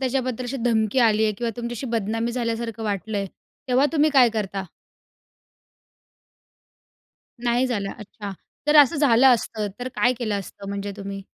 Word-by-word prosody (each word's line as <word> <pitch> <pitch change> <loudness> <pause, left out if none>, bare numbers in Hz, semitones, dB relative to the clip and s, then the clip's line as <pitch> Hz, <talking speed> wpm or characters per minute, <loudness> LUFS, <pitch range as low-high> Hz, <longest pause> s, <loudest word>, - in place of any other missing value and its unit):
त्याच्याबद्दल 255 -1 -1
अशी 260 +3 -4
धमकी 220 0 +2
आली 220 -2 +4
आहे 215 - +2
किंवा 235 -1 -1
तुमच्याशी 240 +2 -4
बदनामी 225 +2 -1
झाल्यासारखं 230 -2 -3
वाटलंय, 205 0 -2 0.4
तेव्हा 255 +3 +4
तुम्ही 305 0 +3
काय 260 -4 +6
करता? 195 -3 -3 2.8
नाही 240 +2 +2
झालं, 205 -5 -2
अच्छा. 205 -1 -8 0.3
तर 295 - +5
असं 295 +3 +7
झालं 270 -3 +5
असतं 215 -2 -3
तर 250 +1 -4
काय 245 - +3
केलं 215 -4 -1
असतं 200 +1 -9
म्हणजे 200 0 -4
तुम्ही? 195 -1 -6
230 Hz, 140 wpm, -23 LUFS, 210-250 Hz, 2.8 s, असं